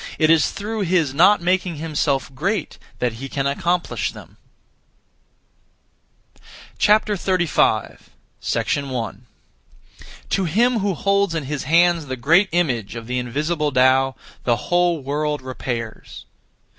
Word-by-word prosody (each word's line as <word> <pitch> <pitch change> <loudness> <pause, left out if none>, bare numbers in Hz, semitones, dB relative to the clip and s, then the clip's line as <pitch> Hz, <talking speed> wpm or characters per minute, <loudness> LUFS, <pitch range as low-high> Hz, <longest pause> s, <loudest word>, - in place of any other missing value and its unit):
It 155 0 +4
is 165 -2 +4
through 215 +2 -5
his 170 -7 +1
not 180 +6 +5
making 180 0 0
himself 145 -3 -1
great 190 +10 -2 0.2
that 125 -2 -1
he 135 - -6
can 135 0 -2
accomplish 170 +5 -1
them. - - -14 2.5
35. 185 - +1 0.7
1. 125 -5 -5 1.1
To 195 - +1
him 230 +8 +2
who 195 -2 -1
holds 200 -1 +1
in 160 - -2
his 140 0 -4
hands 170 +1 +3
the 130 - -3
Great 165 - +3
Image 130 - -1
(of 115 -1 -7
the 125 +2 -2
invisible 150 +5 -1
Tao), 130 0 +3 0.3
the 120 - +2
whole 175 +2 0
world 150 +1 -2
repairs. 120 -3 -6
155 Hz, 120 wpm, -21 LUFS, 130-180 Hz, 2.5 s, not